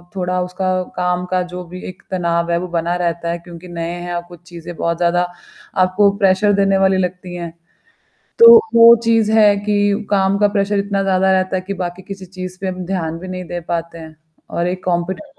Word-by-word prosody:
थोड़ा 180 0 -1
उसका 180 +1 -4 0.3
काम 180 0 -1
का 185 0 -1
जो 180 0 -6
भी 180 +2 -10
एक 185 - -10
तनाव 170 -2 -1
है, 170 - +2
वो 180 - -5
बना 170 0 -1
रहता 170 -1 -2
है 170 - -2
क्योंकि 170 +1 -12
नए 170 -1 -5
हैं 175 0 -6
आपको 175 0 -6
चीज़ें 175 0 -11
बहुत 170 0 -1
ज़्यादा 175 0 +2 0.6
आपको 185 +3 +3
प्रेशर 200 0 +3
देने 195 -1 +2
वाली 190 0 +3
लगती 180 0 -3
हैं। 170 -1 -6 0.9
तो 465 0 +10 0.2
वो 230 0 +9
चीज़ 225 -2 +2
है 210 -2 +6
कि 205 +1 0
काम 195 -1 +2
का 205 - +4
प्रेशर 200 0 +1
इतना 200 0 -1
ज़्यादा 190 0 +2
रहता 185 0 +1
है 185 - -1
कि 200 - -2
बाकी 175 +1 -5
किसी 195 0 -9
चीज़ 185 0 -8
पे 195 - -2
हम 185 -1 -5
ध्यान 165 -3 -3
भी 185 - -9
नहीं 185 0 -5
दे 175 +1 -4
पाते 170 0 -4
हैं। 160 -1 -11 0.3
और 170 +1 -2
एक 185 +1 -4
कॉम्पिटिट 180 - -2
185 Hz, 205 wpm, -18 LUFS, 175-195 Hz, 0.9 s, तो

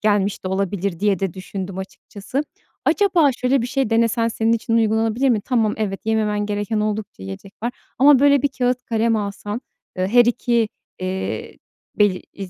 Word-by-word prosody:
gelmiş 205 -2 +1
de 185 - -1
olabilir 195 -2 -2
diye 205 -2 +2
de 190 -2 -2
düşündüm 190 0 -6
açıkçası. 200 +6 -5 0.4
Acaba 360 -8 +4
şöyle 250 0 +1
bir - - -2
şey 265 -2 -1
denesen 230 0 +2
senin 225 0 +1
için 230 0 +1
uygulanabilir 225 +3 +2
mi? 230 -4 +2
Tamam, 220 -1 +1
evet, 200 -3 -2
yememen 210 -2 +1
gereken 205 +1 -1
oldukça 210 - -3
yiyecek 95 - -8
var 240 - -1 0.3
ama 280 +1 +7
böyle 280 0 +4
bir 285 - +3
kâğıt 250 -1 -1
kalem 225 0 +1
alsan, 205 +1 -4 0.4
ııı, 185 - +1
her 240 +3 +6
2, 235 -1 +1 0.3
eee, 185 +1 -4 0.4
bel 205 -2 +4 0.2
i 195 -2 -7
220 Hz, 170 wpm, -21 LUFS, 200-240 Hz, 0.4 s, ama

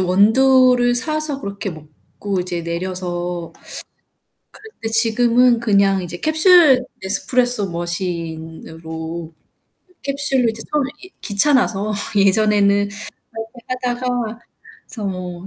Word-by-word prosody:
원두를 245 +6 +4
사서 300 +2 -1
그렇게 200 -1 -5
먹고 160 +5 -7
이제 175 -1 -3
내려서 175 0 -4 1.1
그런데 435 - -8
지금은 235 +2 +3
그냥 200 -4 +2
이제 175 0 -6
캡슐 315 -5 +5 0.2
네스프레소 245 +1 +1
머신으로 165 -1 -5 0.7
캡슐로 275 -3 +1
이제 225 0 -5
처음에 290 -3 0 0.2
예 - - -14
귀찮아서 215 -2 +1 0.2
예전에는 205 0 +3 0.5
그렇게 225 +2 -8
하다가 245 -2 -3 0.5
그래서 215 -4 -8
뭐 180 -1 -6
210 Hz, 245 characters per minute, -19 LUFS, 180-250 Hz, 1.1 s, 캡슐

